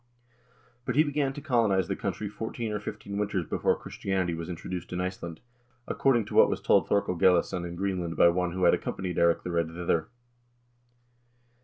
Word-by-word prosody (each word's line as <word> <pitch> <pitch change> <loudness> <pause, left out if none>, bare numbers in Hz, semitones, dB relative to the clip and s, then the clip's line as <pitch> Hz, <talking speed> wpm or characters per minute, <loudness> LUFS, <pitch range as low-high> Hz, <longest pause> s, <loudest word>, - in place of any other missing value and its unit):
But 125 - -2
he 155 - +6
began 145 -2 0
to 145 - -8
colonize 115 - +2
the - - -1
country 105 - -3
fourteen 110 +2 -4
or 105 - -2
fifteen 100 -1 -6
winters 95 -4 -1
before - - +1
Christianity 95 -3 -2
was 85 +1 -5
introduced 90 +1 -6
in 90 - -3
Iceland,2 90 -3 -4 0.5
according 120 -5 +2
to - - -9
what - - +6
was - - -1
told - - +3
Thorkel 100 -2 +2
Gellisson 90 0 +2
in 85 - -7
Greenland 90 -3 -2
by 85 - +7
one 90 0 0
who 95 0 -2
had - - +6
ac - - 0
companied 90 -3 -4
Eirik 85 0 +3
the 90 - -4
Red 85 -1 +1
thither." 85 -1 -1
90 Hz, 185 wpm, -28 LUFS, 85-105 Hz, 0.5 s, by